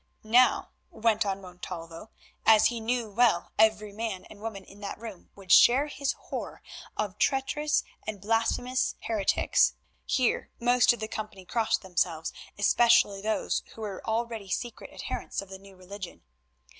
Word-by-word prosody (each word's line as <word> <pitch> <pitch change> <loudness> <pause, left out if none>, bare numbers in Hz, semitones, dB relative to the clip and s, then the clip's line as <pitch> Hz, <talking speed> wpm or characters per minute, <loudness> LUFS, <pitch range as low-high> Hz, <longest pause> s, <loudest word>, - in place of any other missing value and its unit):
Now, 240 +2 +4 0.2
went 220 -1 +1
on 195 0 -2
Montalvo, 180 0 -9 0.3
as 220 -1 +6
he 240 -1 -4
knew 230 -1 -1
well, 215 -5 +2
every 215 -1 +3
man 215 -3 -4
and 210 - -13
woman 215 -3 -5
in 200 +2 -16
that 200 -1 -6
room 220 -5 -10
would 195 -2 -7
share 260 +8 +7
his 280 -2 -2
horror - - -7 0.3
of 210 -1 -3
traitorous 295 +2 +1 0.2
and 215 -2 -4
blasphemous 230 +5 0
heretics—here 230 +3 0
most 245 +1 +4
of 240 - -4
the 215 - -2
company 215 -4 -7
crossed 225 +2 0
themselves, 175 -3 -1 0.2
especially 205 -1 +4
those 215 +1 0
who 225 - -10
were 205 -3 -5
already 225 -2 -2
secret 240 +5 -4
adherents - - -5
of 195 - -6
the 190 0 -9
New 195 0 -16
Religion. 185 - -9
215 Hz, 145 wpm, -28 LUFS, 195-235 Hz, 0.3 s, share